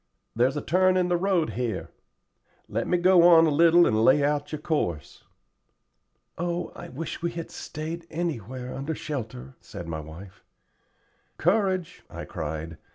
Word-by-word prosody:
"There's 130 +5 +2
a - - -3
turn 185 +2 +3
in 180 -1 +1
the 175 - +2
road 175 -3 +1
here. 115 -5 -3 0.8
Let 115 +3 -2
me 180 - +2
go 180 0 +5
on 170 -1 +7
a 155 - +2
little 170 +3 +6
and 110 +1 +2
lay 140 +4 +5
out 145 0 0
your 155 - -3
course." 90 - -3 1.1
"Oh, 175 +1 -2
I - - -9
wish 155 +6 -6
we 170 - 0
had 170 -1 -6
stayed 165 +2 -6
anywhere 130 - -4
under 140 +4 -4
shelter," 110 - -6
said 85 - -9
my 80 -1 -4
wife. 85 +6 -11 0.9
"Courage," 185 -1 0
I - - -7
cried. 80 +1 -5
155 Hz, 155 wpm, -26 LUFS, 110-175 Hz, 1.1 s, on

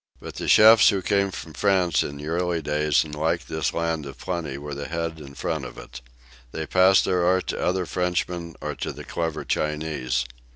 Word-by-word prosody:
But - - -9
the - - -5
chefs 110 0 +8
who 95 -2 0
came 100 0 +2
from 80 -4 -8
France 95 -4 +2
in 70 - -4
the 75 - -8
early 85 +1 0
days 75 -1 +1
and 75 -1 -10
liked 80 +3 -1
this 80 -3 -1
land 80 -3 -2
of 70 - -10
plenty 80 -7 -4
were 75 +1 -7
the 70 +1 -5
head 85 -1 -3
and 70 -2 -11
front 80 -4 -2
of 60 - -9
it. - - -10 0.5
They 80 +4 -4
passed 95 +3 +4
their 90 -1 +1
art 95 +1 +2
to - - -2
other 90 0 0
Frenchmen 90 -1 -2
or - - -3
to - - -3
the - - -9
clever 80 -2 -3
Chinese. 75 -5 -1
80 Hz, 205 wpm, -24 LUFS, 75-90 Hz, 0.5 s, chefs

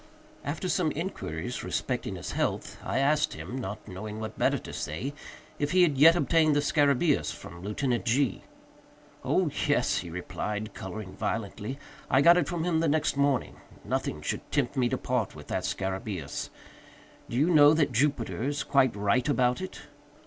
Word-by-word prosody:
After 150 +6 -3
some 180 -4 +1
inquiries 140 - -4
respecting - - -2
his - - -6
health, - - -2
I - - -2
asked 150 +3 +2
him, 125 - -7
not 110 -5 -5
knowing 105 +3 -6
what 110 0 -5
better - - +2
to - - -9
say, 100 - -4 0.5
if 145 +2 -1
he 185 -1 +6
had 155 -5 +3
yet 160 +5 +7
obtained 160 -3 +3
the - - +4
scarabæus 145 0 +2
from 85 0 -10
Lieutenant 120 +5 -1
G——. 125 -1 +1 0.8
"Oh, - - +1 0.2
yes," - - +2
he 90 - -6
replied, 105 +5 -4
coloring 95 0 -7
violently, 105 +3 -3 0.3
"I 130 - +4
got 170 +4 +8
it 170 -6 +1
from 170 -2 -2
him 170 -2 +1
the 165 - +2
next 155 0 +1
morning. 140 -2 +1 0.3
Nothing 75 0 -2
should - - -3
tempt - - 0
me 125 -2 +2
to 130 - 0
part 125 -9 -1
with 75 -1 -10
that - - -1
scarabæus. 95 -4 -3 0.8
Do 120 - -3
you 155 +7 +3
know 150 -1 +7
that 155 -4 +2
Jupiter 130 -3 0
is 145 +3 -1
quite 130 -4 +3
right 105 +7 +1
about 125 -1 +2
it?" 185 - -7
130 Hz, 170 wpm, -28 LUFS, 105-150 Hz, 0.8 s, got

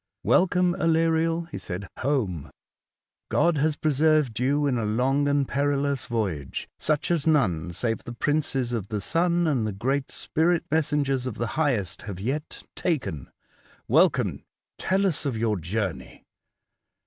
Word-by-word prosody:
''Welcome, 180 -1 +3
Aleriel, 165 0 +2
he - - -5
said, 100 +2 -5
home! 110 - -1 0.8
God 170 -2 +2
has 150 +1 +1
preserved 150 -5 +2
you 140 +3 +2
in 130 -4 +1
a - - -1
long 130 +7 +1
and 140 -1 +2
perilous 140 -1 0
voyage, 95 - -3
such 155 +2 0
as 165 -3 0
none, 90 - +2
save 115 +6 -2
the 120 - -7
princes 135 -2 0
of 110 -5 -2
the 105 -1 -3
sun 170 - +1
and 130 -9 +1
the - - -2
great 130 +7 -1
spirit 165 +2 +1
messengers 140 -4 +1
of 120 - -4
the 115 -1 -2
Highest, 125 - 0
have 95 -2 -6
yet 135 +9 -4
taken. 135 - -2 0.6
Welcome, - - +2 0.4
tell 195 +1 +1
us 160 -5 0
of 125 -5 -2
your 110 -2 0
journey! 95 +2 -4
140 Hz, 145 wpm, -25 LUFS, 110-155 Hz, 0.8 s, Welcome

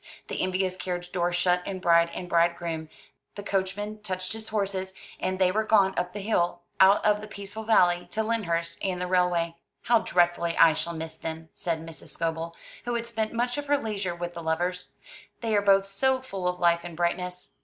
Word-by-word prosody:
The - - -2
envious 185 0 0
carriage 180 -1 -4
door 175 -1 0
shut 180 0 +2
in 195 - -3
bride 170 -1 +4
and 180 - -5
bride 170 0 +3
groom, 160 -2 -4 0.5
the 205 - -6
coachman 205 +2 -2
touched 185 -1 -3
his 220 0 -5
horses, 195 -3 -2 0.3
and 185 0 -1
they 185 -1 +3
were 215 +3 +1
gone 200 -3 +4
up 180 0 -1
the 205 - -5
hill, 175 -4 0 0.2
out 190 +1 +6
of 210 0 +3
the 215 - -7
peaceful 205 +1 -7
valley, 175 -5 +4
to 220 - -1
Lyndhurst 170 -7 -1
and 185 -2 -1
the 180 - -1
railway. 175 -2 +1 0.3
"How 235 -1 +4
dreadfully 175 -2 +1
I 165 -1 +7
shall 170 +2 -2
miss 160 0 -5
them," 160 0 -6
said 165 -3 -2
Mrs. 165 -1 -10
Scobel, 165 0 -3 0.3
who 240 0 -1
had 235 0 -2
spent 220 -2 -2
much 245 +3 -1
of 290 - -6
her 290 0 +4
leisure 205 -8 -3
with 175 0 -5
the 170 - -6
lovers. 175 +3 -2 0.5
"They 225 -2 0
are 205 - +4
both 195 -1 +4
so 260 +7 +1
full 195 -8 -4
of 180 0 -1
life 170 -1 +4
and 170 -2 -9
brightness!" 180 +1 -2
185 Hz, 205 wpm, -27 LUFS, 170-205 Hz, 0.5 s, I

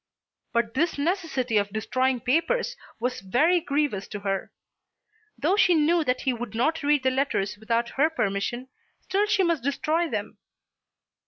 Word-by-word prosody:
But 235 -1 0
this 320 +4 0
necessity 285 - 0
of 200 0 -2
destroying 255 +4 0
papers 335 - +1 0.2
was 250 +2 -2
very 310 - +3
grievous 280 -10 -1
to 205 0 -7
her. 195 -1 -2 0.9
Though 345 +7 +2
she 365 -4 +4
knew 325 +2 +3
that 255 -1 0
he 260 - +1
would 235 -2 -6
not 315 +8 +1
read 290 -2 +2
the 260 - +3
letters 255 -7 0
without 230 +2 -1
her 295 +6 +2
permission, 240 -1 -2 0.3
still 400 +2 0
she 400 -2 +2
must 335 -5 +1
destroy 310 +5 0
them. - - -4
265 Hz, 155 wpm, -26 LUFS, 235-325 Hz, 0.9 s, she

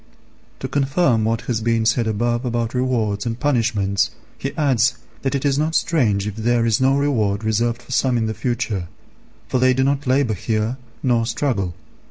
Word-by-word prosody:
To 130 - -2
confirm 135 -3 +1
what 115 +1 0
has 115 -3 -2
been 115 0 +1
said 115 0 +2
above 120 +3 0
about 120 -2 -2
rewards 120 -5 0
and 115 +1 -3
punishments, 115 -8 +1 0.3
he 135 - -4
adds 130 -6 +2 0.3
that 135 0 -1
it 140 - -2
is 140 0 +2
not 160 +2 0
strange 110 - +2
if 105 0 -5
there 115 +1 +1
is 115 +1 +2
no 135 +1 +4
reward 110 -8 0
reserved 115 +2 0
for 125 - -13
some 130 -1 +2
in 115 - 0
the 110 - -2
future; 115 -7 -2 0.6
for 130 - 0
they 130 0 +4
do 130 - +2
not 140 0 0
labour 130 -3 +2
here 110 +4 -1 0.3
nor 120 -3 +2
struggle. 115 -8 -1
120 Hz, 185 wpm, -21 LUFS, 110-130 Hz, 0.6 s, no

